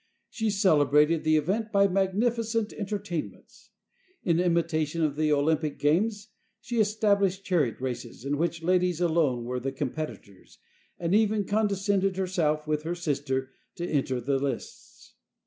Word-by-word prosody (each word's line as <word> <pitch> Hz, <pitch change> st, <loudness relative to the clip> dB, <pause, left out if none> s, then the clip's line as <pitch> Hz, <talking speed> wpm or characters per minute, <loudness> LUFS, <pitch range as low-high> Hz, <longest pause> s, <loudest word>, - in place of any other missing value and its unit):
She 225 Hz, -2 st, -1 dB
celebrated 155 Hz, -, +3 dB
the 155 Hz, 0 st, +3 dB
event 205 Hz, +8 st, -1 dB
by 200 Hz, -1 st, +4 dB
magnificent 220 Hz, +4 st, 0 dB
entertainments. 200 Hz, -5 st, -6 dB, 0.5 s
In 170 Hz, -2 st, +2 dB
imitation 165 Hz, -2 st, +1 dB
of 150 Hz, -2 st, 0 dB
the 155 Hz, 0 st, +1 dB
Olympic 150 Hz, +1 st, +1 dB
games, 205 Hz, +8 st, +1 dB, 0.3 s
she 235 Hz, 0 st, -3 dB
established 200 Hz, -3 st, +2 dB
chariot 155 Hz, -, +1 dB
races, 125 Hz, -1 st, -5 dB
in 145 Hz, +1 st, -1 dB
which 170 Hz, 0 st, -1 dB
ladies 180 Hz, -1 st, +2 dB
alone 160 Hz, -8 st, +1 dB
were 125 Hz, +1 st, -3 dB
the 135 Hz, +2 st, -3 dB
competitors, 135 Hz, -8 st, -6 dB, 0.4 s
and 170 Hz, +1 st, -1 dB
even 215 Hz, -1 st, +2 dB
condescended 200 Hz, -2 st, +1 dB
herself, 165 Hz, -5 st, 0 dB
with 150 Hz, -1 st, -1 dB
her 165 Hz, +3 st, -3 dB
sister, 140 Hz, -5 st, -2 dB, 0.2 s
to 175 Hz, -, -4 dB
enter 135 Hz, -5 st, 0 dB
the 135 Hz, +3 st, 0 dB
lists. 135 Hz, -3 st, -6 dB
170 Hz, 135 wpm, -27 LUFS, 145-200 Hz, 0.5 s, by